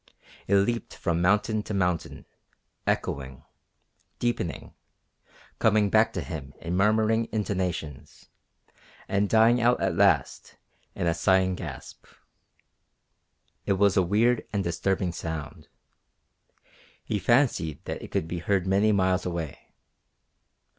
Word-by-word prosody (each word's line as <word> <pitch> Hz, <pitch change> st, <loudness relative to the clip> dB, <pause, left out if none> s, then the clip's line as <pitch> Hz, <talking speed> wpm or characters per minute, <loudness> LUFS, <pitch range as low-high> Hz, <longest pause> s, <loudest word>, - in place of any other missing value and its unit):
It 100 Hz, -, +3 dB
leaped 115 Hz, +4 st, 0 dB
from 85 Hz, -1 st, -1 dB
mountain 105 Hz, +4 st, +2 dB
to 105 Hz, 0 st, -5 dB
mountain, 90 Hz, -4 st, -2 dB, 0.6 s
echoing, 65 Hz, -1 st, -2 dB, 0.7 s
deepening, 120 Hz, -8 st, -3 dB, 0.9 s
coming 105 Hz, -2 st, +3 dB
back 110 Hz, +1 st, +4 dB
to -, -, -3 dB
him 75 Hz, -6 st, -7 dB
in 85 Hz, +1 st, -4 dB
murmuring 110 Hz, +3 st, +2 dB
intonations, 90 Hz, -9 st, -4 dB, 0.8 s
and 100 Hz, +1 st, 0 dB
dying 115 Hz, +2 st, +4 dB
out 120 Hz, +1 st, +3 dB
at 95 Hz, -3 st, 0 dB
last 90 Hz, -8 st, +1 dB, 0.4 s
in -, -, -2 dB
a 85 Hz, -, +2 dB
sighing 95 Hz, +2 st, +2 dB
gasp. 90 Hz, -, -9 dB, 1.6 s
It 100 Hz, -, +3 dB
was 100 Hz, 0 st, +3 dB
a 95 Hz, -, +5 dB
weird 110 Hz, +7 st, +2 dB
and 100 Hz, -2 st, -1 dB
disturbing 90 Hz, +1 st, -1 dB
sound. 80 Hz, -2 st, -6 dB, 1.4 s
He 105 Hz, -, -2 dB
fancied 120 Hz, -, +1 dB
that -, -, -5 dB
it -, -, -9 dB
could 80 Hz, -, -2 dB
be 85 Hz, +1 st, -4 dB
heard 95 Hz, +1 st, 0 dB
many 100 Hz, +3 st, +3 dB
miles 95 Hz, -2 st, +2 dB
away. 85 Hz, -5 st, -6 dB
95 Hz, 120 wpm, -26 LUFS, 85-105 Hz, 1.6 s, a